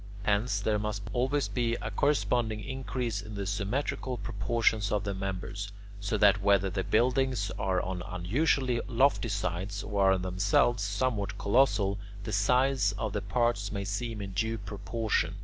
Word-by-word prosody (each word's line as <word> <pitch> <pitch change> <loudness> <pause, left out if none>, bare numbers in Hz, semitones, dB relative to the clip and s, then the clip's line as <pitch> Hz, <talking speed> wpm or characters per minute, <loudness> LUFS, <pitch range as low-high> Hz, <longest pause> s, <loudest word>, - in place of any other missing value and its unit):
Hence 105 +2 +1
there 105 0 +1
must 105 -1 -3
always 130 +3 +1
be 120 -2 0
a 105 - -4
corresponding 120 -3 +1
increase 125 -3 -3
in 105 0 -8
the 100 -1 -3
symmetrical 125 +6 -2
proportions 110 0 0
of 105 -1 +1
the 100 0 -2
members, 95 +1 -4 0.3
so 100 +2 -1
that 100 -1 +5
whether 100 -1 +3
the 95 0 -1
buildings 125 -1 +1
are 95 -1 +1
on 90 0 -3
unusually 120 - +1
lofty 130 0 +2
sites 100 0 -2
or 100 -2 +3
are - - +2
themselves 95 +6 +2
somewhat 100 +1 -1
colossal, 100 -3 +2 0.2
the 110 - -4
size 125 +6 +3
of - - -2
the - - -1
parts 120 -5 0
may 100 -1 -3
seem 105 +1 -3
in 95 - -6
due 110 +4 -1
proportion. 105 0 -2
105 Hz, 155 wpm, -29 LUFS, 100-120 Hz, 0.3 s, that